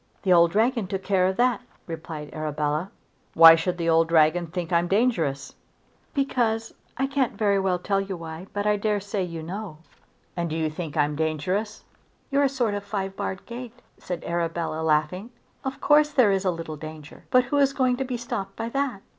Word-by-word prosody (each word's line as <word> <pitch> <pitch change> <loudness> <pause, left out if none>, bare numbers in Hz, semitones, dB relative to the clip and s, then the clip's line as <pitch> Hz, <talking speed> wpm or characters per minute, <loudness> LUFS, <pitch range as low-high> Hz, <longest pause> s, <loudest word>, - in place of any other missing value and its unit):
"The 185 -3 +4
old 170 -1 +6
dragon 225 +2 +1
took 190 +1 -4
care 185 -2 +2
of 190 - -2
that," 245 0 +2 0.2
replied 160 -2 -7
Arabella. 155 +2 -2 0.5
"Why 165 0 +10
should 175 +2 0
the 170 -1 -2
old 165 0 +4
dragon 165 +1 +3
think 175 0 -5
that 170 - +4
I'm 170 +1 0
dangerous?" 175 - 0 0.6
"Because; 230 -5 0 0.2
I 270 - +1
can't 270 -2 -1
very 200 -3 +2
well 190 -2 +1
tell 195 +2 0
you 195 -2 -5
why, 165 +2 -8
but 205 0 -3
I 210 0 +3
dare 210 0 0
say 200 0 -3
you 170 -3 -4
know." 185 0 -6 0.6
"And 170 -1 -2
do 155 - -3
you 160 -1 -1
think 160 -1 -6
I 150 - +5
am 150 0 -4
dangerous?" 180 +8 -2 0.5
"You're 280 +1 +3
a - - +3
sort 245 -6 0
of 205 - -2
a - - -21
five 195 -2 -3
barred 190 -1 -4
gate," 245 0 -8 0.2
said 180 -2 -5
Arabella 170 -1 -2
laughing. 160 +7 0 0.3
"Of 265 0 -4
course 300 0 +4
there 255 -8 +4
is 195 0 0
a - - +3
little 165 -3 -5
danger, 155 0 -10
but 255 0 +5
who 265 +4 -1
is 275 -1 +4
going 255 -2 +1
to 270 - -1
be 250 -2 -3
stopped 200 -5 -5
by 225 +1 -4
that?" 265 -6 -2
190 Hz, 205 wpm, -25 LUFS, 165-225 Hz, 0.6 s, Why